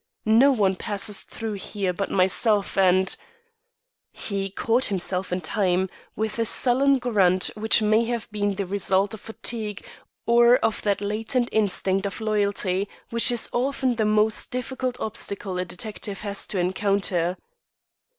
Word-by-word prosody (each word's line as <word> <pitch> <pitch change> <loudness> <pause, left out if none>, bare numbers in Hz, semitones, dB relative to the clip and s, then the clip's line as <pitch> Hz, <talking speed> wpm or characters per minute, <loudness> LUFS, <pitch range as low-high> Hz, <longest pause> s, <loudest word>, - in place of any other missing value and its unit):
No 230 +6 +6
one 200 -7 +2
passes 205 0 -1
through 220 -3 -6
there 190 -1 -2
but 195 +3 -3
myself 195 +2 +2
and 190 0 +3 0.5
" - - -59 0.2
He 195 -1 -2
caught 230 +6 +1
himself 185 -1 -1
in 180 +1 -1
time, 185 +1 0 0.2
with 220 +1 -3
a 230 - +2
sullen 270 +4 +3
grunt 195 -7 +2
which 220 +1 +2
may 215 +2 +3
have 235 -1 -3
been 205 -1 -1
the 200 0 -2
result 195 +1 0
of 220 - -8
fatigue 220 -2 -4 0.4
or 235 +1 +6
of 225 - -1
that 205 -1 0
latent 225 +4 -1
instinct 195 -2 0
of 200 - -7
loyalty 200 -3 0 0.2
which 235 +1 +3
is 240 -2 0
often 260 0 0
the 220 - +1
most 215 +1 +2
difficult 255 0 -3
obstacle 200 -3 -4
a 180 - -1
detective 195 +1 -6
has 200 -1 -4
to 200 - -3
encounter. 185 -1 0
210 Hz, 150 wpm, -24 LUFS, 195-230 Hz, 0.5 s, No